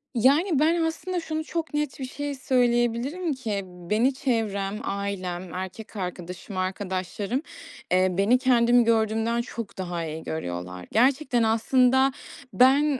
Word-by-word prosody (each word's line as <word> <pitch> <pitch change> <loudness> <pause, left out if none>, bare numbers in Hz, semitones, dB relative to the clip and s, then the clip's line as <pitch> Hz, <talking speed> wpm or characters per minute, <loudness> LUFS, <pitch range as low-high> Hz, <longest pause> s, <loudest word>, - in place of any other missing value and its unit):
Yani, 285 - +4
ben 330 +3 +3
aslında 350 +3 -2
şunu 315 -1 -3
çok 330 0 -4
net 295 -2 -2
bir 265 - -3
şey 290 +2 -4
söyleyebilirim 250 +5 +1
ki; 220 -7 -3
beni 185 +8 0
çevrem, 210 -6 -1
ailem, 185 -3 -4
erkek 190 +5 -7
arkadaşım, 180 0 -6
arkadaşlarım, 190 +5 -2 0.5
eee, 185 +1 +4
beni 210 +6 +4
kendimi 245 -1 +4
gördüğümden 225 +1 +1
çok 230 -3 -7
daha 175 -3 -3
iyi 160 0 -6
görüyorlar. 90 - -5
Gerçekten 255 0 +3
aslında 255 +4 +3 0.4
ben, 275 +2 +4
230 Hz, 125 wpm, -26 LUFS, 190-265 Hz, 0.5 s, Yani